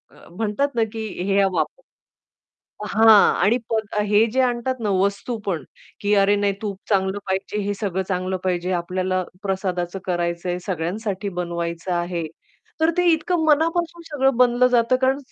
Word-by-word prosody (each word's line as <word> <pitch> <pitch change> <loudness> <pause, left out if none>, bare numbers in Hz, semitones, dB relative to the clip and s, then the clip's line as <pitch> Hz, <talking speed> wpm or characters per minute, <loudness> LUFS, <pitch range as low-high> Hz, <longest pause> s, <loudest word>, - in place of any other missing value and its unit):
अ, - - -17
म्हणतात 225 +6 -1
ना 230 - +3
की 220 -1 -4 0.2
हे 200 +1 +2
वापर 195 - -1 1.1
हां. 220 0 +6
आणि 220 +6 +4 0.5
हे 210 +2 +4
जे 260 - +2
आणतात 250 +1 0
ना, 215 -2 -1
वस्तू 200 +5 0
पण, 170 -6 -1 0.4
की 205 0 +2
अरे 200 +1 +4
नाही 200 0 +1
तूप 200 -3 -4
चांगलं 190 -1 +1
पाहिजे, 190 +2 -2
हे 205 0 -1
सगळं 190 -3 -1
चांगलं 185 0 -1
पाहिजे, 180 0 -1
आपल्याला 185 +1 -1 0.2
प्रसादाचं 190 -2 -2
करायचंय, 175 0 -1
सगळ्यांसाठी 195 +3 -3
बनवायचं 170 0 -3
आहे. 175 -1 -2 0.5
तर 320 +1 +4
ते 360 - +2
इतकं 320 +1 0
मनापासून 330 +2 +1
सगळं 270 -3 +2
बनलं 250 0 +4
जातं, 245 0 +3
कारण 265 +1 +3
200 Hz, 150 wpm, -22 LUFS, 185-240 Hz, 1.1 s, हां